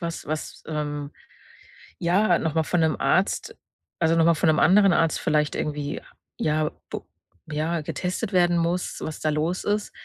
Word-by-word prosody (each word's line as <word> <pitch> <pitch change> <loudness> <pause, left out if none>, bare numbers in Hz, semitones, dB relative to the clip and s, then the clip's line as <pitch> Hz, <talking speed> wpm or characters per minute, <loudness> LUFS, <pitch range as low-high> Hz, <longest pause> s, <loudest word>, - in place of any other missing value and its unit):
was 170 -1 -5
was, 155 +1 -5
ähm, 150 -2 -3 0.9
ja, 185 +5 +3
noch 160 -2 -2
mal 160 - +3
von 175 +2 0
'nem 160 -2 +2
Arzt - - +1 0.4
also, 165 -1 +3
noch 165 -1 +4
mal 170 - +5
von 160 - +1
'nem 155 - +3
anderen 195 0 +6
Arzt 165 -2 +2
vielleicht 150 -1 +1
irgendwie, 150 -1 -3 0.4
ja, 155 0 +1 0.2
bo - - -6 0.4
ja, 155 +2 -1
getestet 185 +7 -3
werden 175 -1 +4
muss, 170 +2 -1
was 155 - -5
da 155 - +1
los 160 +4 -1
ist. 205 0 -1
160 Hz, 165 wpm, -25 LUFS, 150-175 Hz, 0.9 s, anderen